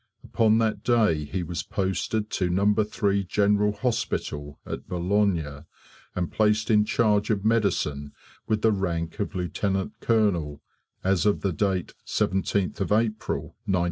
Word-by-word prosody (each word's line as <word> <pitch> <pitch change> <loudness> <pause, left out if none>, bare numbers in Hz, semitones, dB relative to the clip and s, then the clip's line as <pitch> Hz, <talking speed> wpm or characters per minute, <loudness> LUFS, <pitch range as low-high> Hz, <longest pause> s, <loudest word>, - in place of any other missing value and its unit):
Upon 110 -1 +3
that 110 -1 0
day 105 -11 +2
he 90 +5 -3
was 85 +1 -3
posted 105 +3 -2
to 90 -2 0
No. 100 +4 +3
3 105 -2 0
General 105 +2 +2
Hospital 75 - -3
at - - -6
Boulogne, 90 -5 0 0.5
and 90 -2 -2
placed 105 0 +2
in 105 -1 +5
charge 105 -2 +2
of 105 -2 0
medicine 85 -10 +1 0.4
with 110 -1 0
the 110 - +5
rank 85 -3 -2
of 100 - -3
Lieutenant 95 +3 -1
Colonel 90 -11 +1 0.4
as 95 -1 +2
of 105 - +2
date 95 -2 -1
17th 95 0 0
April, 110 +2 -1
1915. 95 - +2
100 Hz, 135 wpm, -26 LUFS, 90-105 Hz, 0.5 s, in